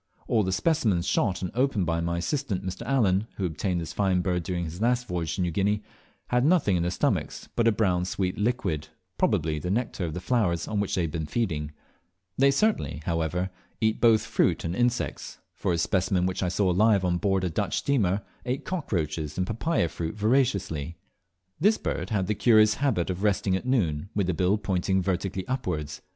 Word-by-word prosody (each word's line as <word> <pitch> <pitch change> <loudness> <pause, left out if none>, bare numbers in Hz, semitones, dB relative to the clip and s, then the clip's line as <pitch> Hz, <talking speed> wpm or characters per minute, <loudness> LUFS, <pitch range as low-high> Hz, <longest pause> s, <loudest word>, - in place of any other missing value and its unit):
All 110 - +3
the 95 -2 -1
specimens 100 - +1
shot 95 0 0
and 90 - -3
opened 125 -6 +1
by 85 0 0
my 85 0 -1
assistant 100 - -2
Mr. 95 0 -5
Allen, 110 -6 +2
who 95 - -2
obtained 90 +2 -1
this 80 - -5
fine 95 -3 +2
bird 90 -1 0
during 85 +1 -3
his 85 +4 -7
last 125 +1 +1
voyage 85 -3 -2
to - - -2
New 90 -1 0
Guinea, 100 +4 0 0.5
had 125 0 +2
nothing 155 - +3
in 85 - +1
their 85 - 0
stomachs 90 - -1
but 115 -1 +2
a - - +6
brown 90 -5 +1
sweet 90 0 -2
liquid, 100 - -1 0.3
probably 75 -1 +1
the 90 - -4
nectar 110 -1 -1
of 80 -2 -3
the - - -2
flowers 90 -6 0
on 105 -2 -1
which 100 - -1
they 90 - +1
had 80 - -2
been 80 -1 -3
feeding. 75 -6 -2 0.6
They 140 +1 +4
certainly, 140 - 0
however, 85 +3 -1 0.3
eat 110 -1 +1
both 110 -2 +5
fruit - - +1
and 85 +2 -2
insects, 120 +1 -1 0.2
for - - -2
a 85 - +1
specimen 90 +1 +1
which 95 0 -2
I 90 - +1
saw 95 +1 +1
alive 100 +1 +3
on 90 -1 +1
board 95 -1 +1
a 90 - 0
Dutch - - -1
steamer 105 -8 +1 0.2
ate 130 +2 -3
cockroaches 80 - -2
and 90 - +1
papaya 110 - 0
fruit 80 +2 -5
voraciously. 100 - 0 0.6
This 210 +7 +4
bird - - -3
had 100 -4 0
the 105 - 0
curious 110 0 +5
habit 95 -11 +1
of 90 +1 -5
resting 100 -2 +1
at 95 - -4
noon 95 - 0
with 100 -2 +1
the 90 - 0
bill 90 +5 +2
pointing 95 -1 0
vertically 95 0 -2
upwards. 75 - -3
95 Hz, 200 wpm, -27 LUFS, 85-110 Hz, 0.6 s, a